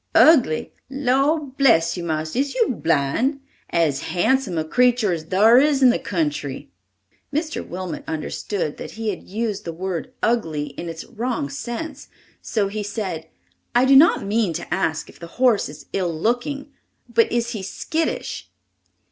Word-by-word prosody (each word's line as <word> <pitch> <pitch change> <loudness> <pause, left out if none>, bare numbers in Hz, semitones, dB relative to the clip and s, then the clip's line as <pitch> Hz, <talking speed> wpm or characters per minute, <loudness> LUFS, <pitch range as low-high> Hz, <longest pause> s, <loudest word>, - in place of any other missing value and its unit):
"Ugly! 260 - +5 0.2
Lor' 275 +3 +2
bless 260 - +2
you, 175 - -5
marster, 155 +5 -2
is 280 - -1
you 470 -2 +2
blind? 185 - +1 0.3
As 155 -5 +1
handsome 200 0 +1
a 160 - +1
creetur 245 +1 +3
as 160 -2 -4
thar 215 +8 +6
is 285 -1 +3
in 250 - +8
the - - -1
country!" 150 - -3 0.6
Mr. 310 +2 -2
Wilmot 180 -2 -6
understood 160 +1 -3
that - - -8
he 225 0 -3
had 195 - -4
used 215 0 -2
the 170 - -4
word 180 +5 -4
ugly 160 -11 0
in 165 +5 -7
its 165 0 -7
wrong 235 - -3
sense, 280 - -6 0.3
so 210 -3 0
he 210 +2 -4
said: 195 -6 -4 0.5
"I 245 +2 +5
do 270 +1 +6
not 305 -3 +6
mean 205 -3 +1
to 165 0 -4
ask 160 -3 -1
if - - -16
the 170 - -8
horse 245 - +3
is 145 +1 -11
ill 180 -3 0
looking, 260 - -1 0.4
but 230 -1 +2
is 235 0 0
he 215 -4 -4
skittish?" 315 +11 -3
215 Hz, 160 wpm, -22 LUFS, 165-255 Hz, 0.6 s, in